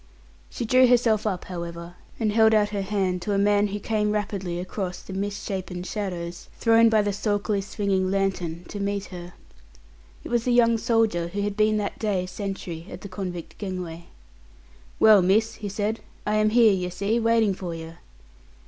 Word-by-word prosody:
She 240 - -4
drew 255 +3 +5
herself 230 -3 +3
up, 185 -4 -2
however, 170 -1 -6 0.3
and 220 -2 +1
held 220 0 +5
out 210 -1 +3
her 205 -1 -2
hand 190 -2 -1
to 205 - -2
a - - +2
man 205 +1 +3
who 205 +1 -4
came 210 0 0
rapidly 195 -4 -2
across 185 0 -4
the 190 - -10
misshapen 190 -2 -4
shadows, 180 -4 -5
thrown 230 0 +5
by 215 -2 +3
the 205 -1 -1
sulkily 205 0 0
swinging 195 -2 -1
lantern, 185 -3 -1
to 205 - -6
meet 200 0 -2
her. 175 0 -8 0.9
It - - -7
was 240 -1 +1
the 250 - +2
young 230 -1 +4
soldier 220 -8 +1
who 200 +4 -3
had 205 0 -2
been 215 0 +3
that 205 -1 -3
day 200 -4 0
sentry 185 -3 -6
at - - -9
the 200 - -8
convict 180 -3 -6
gangway. 180 -4 -5 0.9
"Well, 215 -3 +7
miss," 210 +5 +2
he 205 - -5
said, 210 +3 -2 0.3
"I 210 0 +1
am 215 0 +3
here, 225 -2 +5
yer 180 -1 -2
see, 200 +6 0
waiting 225 -3 +3
for 180 -3 -5
yer." 165 +1 -9
200 Hz, 180 wpm, -25 LUFS, 180-215 Hz, 0.9 s, Well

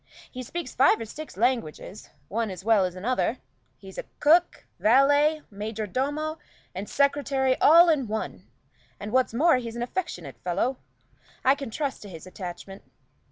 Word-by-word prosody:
He 255 - -7
speaks 330 +3 -6
five 265 -1 +4
or 225 - -4
six 300 +1 -9
languages, 225 -5 -2 0.2
one 225 +1 -2
as 185 0 -8
well 220 -4 +4
as 180 -1 -4
another. 245 +5 -1 0.4
He's 190 -1 -10 0.2
cook, 335 +4 +3
valet, 290 +6 +4
major 215 +2 -4
domo, 290 - -2 0.3
and 190 +3 -6
secretary 275 -2 +1
all 335 +4 +8
in 295 -7 +2
one; 220 +1 -5 0.5
and 210 +1 -6
what's 255 +1 +2
more, 315 +2 +4
he's 235 -2 -6
an 235 - -2
affectionate 180 - -5
fellow 195 +9 -1 0.7
I 265 - +6
can 275 -3 -6
trust 280 +3 -3
to 205 - -10
his 165 -4 -10
attachment. 185 +1 -8
245 Hz, 155 wpm, -26 LUFS, 205-285 Hz, 0.7 s, all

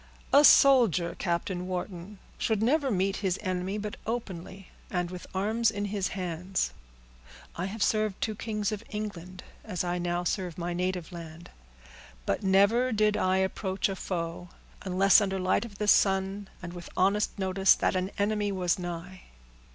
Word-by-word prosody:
"A 285 +2 +8
soldier, 235 - +6
Captain 175 +1 -2
Wharton, 185 +1 -5 0.2
should 220 -1 0
never 280 +3 +2
meet 195 -2 0
his 190 -2 -1
enemy 185 +1 -2
but 210 0 -5
openly, 195 -5 -5 0.2
and 175 -1 -2
with 180 -1 -8
arms 215 +4 +2
in 205 -2 -3
his 200 -2 -1
hands. 180 +1 -2 0.8
I 175 - -3
have 200 +2 -2
served 215 -3 +1
two 220 - -1
kings 210 -1 -2
of 215 0 -4
England, 185 -4 -6 0.2
as 185 -6 -3
I 175 0 -1
now 175 0 -1
serve 180 -1 -2
my 175 0 -3
native 180 -1 -2
land; 170 -1 -10 0.7
but 100 - 0
never 200 +6 +3
did 215 -1 +2
I 185 0 +2
approach 190 +1 -1
a 195 - -3
foe, 175 -1 -4 0.3
unless 195 +2 +5
under 195 -1 -1
the 185 - -3
light 185 +5 +2
of 205 -4 -11
the 210 - -2
sun, 195 0 +3 0.2
and 175 0 -6
with 175 -1 -9
honest 200 +4 +2
notice 190 0 +4
that - - 0
an 185 +1 0
enemy 205 0 0
was 180 -2 0
nigh." 175 +1 -7
190 Hz, 165 wpm, -28 LUFS, 180-210 Hz, 0.8 s, A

